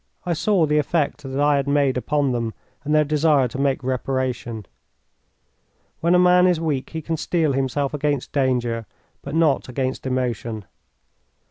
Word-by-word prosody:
I 175 - 0
saw 185 +1 +2
the 150 0 +2
effect 150 0 0
that 135 -1 -5
I 145 0 +3
had 140 0 -1
made 140 -2 +2
upon 140 +2 0
them 115 -2 -2 0.3
and 150 +1 0
their 155 - +5
desire 150 -2 +2
to 130 - -6
make 135 -2 0
reparation. 125 -4 -2 1.3
When 170 +2 +3
a - - +6
man 180 0 +5
is 175 -3 +2
weak 150 -5 -2
he 160 -1 -6
can 165 +1 -2
steel 160 -1 0
himself 135 +1 -1
against 145 -2 -1
danger, 120 -5 0 0.3
but 140 +2 -6
not 160 -5 +2
against 130 +1 -3
emotion. 120 -4 -2
140 Hz, 160 wpm, -22 LUFS, 130-155 Hz, 1.3 s, a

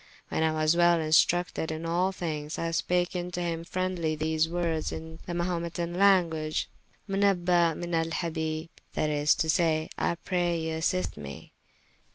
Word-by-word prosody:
When - - -1
I 160 0 +3
was 155 +1 +2
well 175 -1 +5
instructed 160 +1 +2
in 160 +1 -4
all 175 +3 +1
thynges, 155 -4 -4
I 165 0 -2
spake 175 +2 +1
vnto 180 -1 -4
him 165 -1 -2
friendly 180 -3 -1
these 160 +1 +1
woordes 170 -2 -1
in 160 0 -7
the 175 - -3
Mahumets 170 -1 -2
language 175 -3 +2 0.4
Menaba 180 -4 +3
Menalhabi, 165 -1 -2 0.2
that 155 - 0
is 150 0 +3
to 160 - 0
say, 160 -1 +2
I - - +1
pray 175 -1 -1
you 160 0 -2
assist 185 +3 -1
mee. 70 -2 -9
165 Hz, 150 wpm, -28 LUFS, 160-175 Hz, 0.4 s, well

